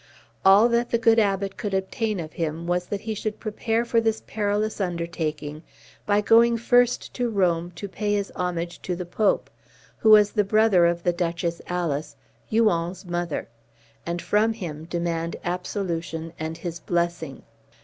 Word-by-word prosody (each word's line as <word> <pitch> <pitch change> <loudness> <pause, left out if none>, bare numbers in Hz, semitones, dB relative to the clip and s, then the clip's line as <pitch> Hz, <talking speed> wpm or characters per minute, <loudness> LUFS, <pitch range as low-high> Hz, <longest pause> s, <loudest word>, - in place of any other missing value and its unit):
All 195 +4 +7
that 235 0 +1
the 235 - +2
good 230 0 +4
Abbot 195 -2 0
could 205 -4 -2
obtain 205 +2 -1
of 155 -2 -6
him 165 0 -3
was, 175 +1 -1
that 200 -1 -3
he 220 0 -3
should 215 0 -4
prepare 225 +1 -1
for 230 -1 +2
this 225 -1 0
perilous 210 0 -1
undertaking 160 -4 -3 0.5
by 205 0 +3
going 230 +2 +5
first 245 +1 +2
to 245 -1 -1
Rome, 175 -5 +1
to 200 - -6
pay 205 +2 -1
his 200 -1 -2
homage 175 -1 -3
to 180 - -3
the 180 +1 -5
Pope, 200 +4 0 0.5
who 220 - +3
was 210 -1 +7
the 210 - +2
brother 205 -4 +4
of 170 0 -1
the 175 - +2
Duchess 170 -1 -2
Alice, 165 -4 -2 0.3
Huon's 185 -5 +1
mother, 175 -3 -3 0.6
and 170 0 -4
from 220 +2 +2
him 160 -7 -6
demand 170 -1 -2
absolution 170 -3 -3
and 160 +1 -4
his 170 -1 -5
blessing. 170 -5 -2
185 Hz, 160 wpm, -25 LUFS, 170-215 Hz, 0.6 s, All